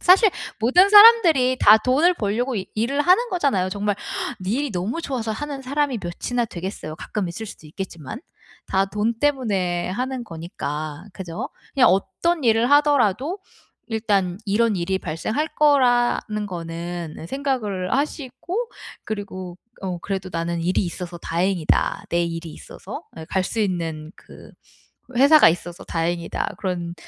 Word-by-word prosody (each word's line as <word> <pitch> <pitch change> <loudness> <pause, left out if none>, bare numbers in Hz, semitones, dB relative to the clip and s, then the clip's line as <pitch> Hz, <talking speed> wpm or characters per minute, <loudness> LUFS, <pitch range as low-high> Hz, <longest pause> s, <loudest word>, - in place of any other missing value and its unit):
사실 385 +4 +6 0.3
모든 265 - +5
사람들이 400 - +7
다 210 +1 +8
돈을 275 +10 +3
벌려고 235 +1 -1
이 190 - -3
일을 240 +7 0
하는 370 +10 +4
거잖아요 275 - +1
정말. 205 +1 -1 0.5
니 185 +2 -2
일이 285 +1 -1
너무 195 - -2
좋아서 250 -8 -3
하는 275 +4 -5
사람이 280 -1 -1
몇이나 235 +8 -2
되겠어요 175 -5 -6
가끔 195 +2 -4
있을 220 +6 -6
수도 160 - -11
있겠지만. 165 -5 -7 0.5
다 190 0 +2
돈 210 +4 -1
때문에 200 -12 0
하는 250 +4 -3
거니까 155 -3 -6
그죠? 185 +4 -6 0.3
그냥 260 -2 +6
어떤 320 - 0
일을 230 +1 +3
하더라도 290 - +3 0.5
일단 200 -5 0
이런 215 +2 +2
일이 185 +2 -1
발생할 215 - -2
거라는 245 -7 +3
거는 170 -2 -6
생각을 230 -9 -2
하시고 300 - -3 0.4
그리고 185 -4 -6 0.3
어 185 -2 -3
그래도 190 +1 -4
'나는 170 0 -2
일이 180 +4 +1
있어서 175 0 -6
다행이다, 175 0 0
내 170 0 +2
일이 165 0 -5
있어서.' - - -9
예 160 - -7
'갈 190 - +1
수 225 - -2
있는 165 -5 -2
그 - - -15 0.7
회사가 285 +4 +7
있어서 175 +1 -3
다행이다.' 170 +1 -2
그런 175 -3 -3
210 Hz, 310 characters per minute, -22 LUFS, 175-265 Hz, 0.7 s, 다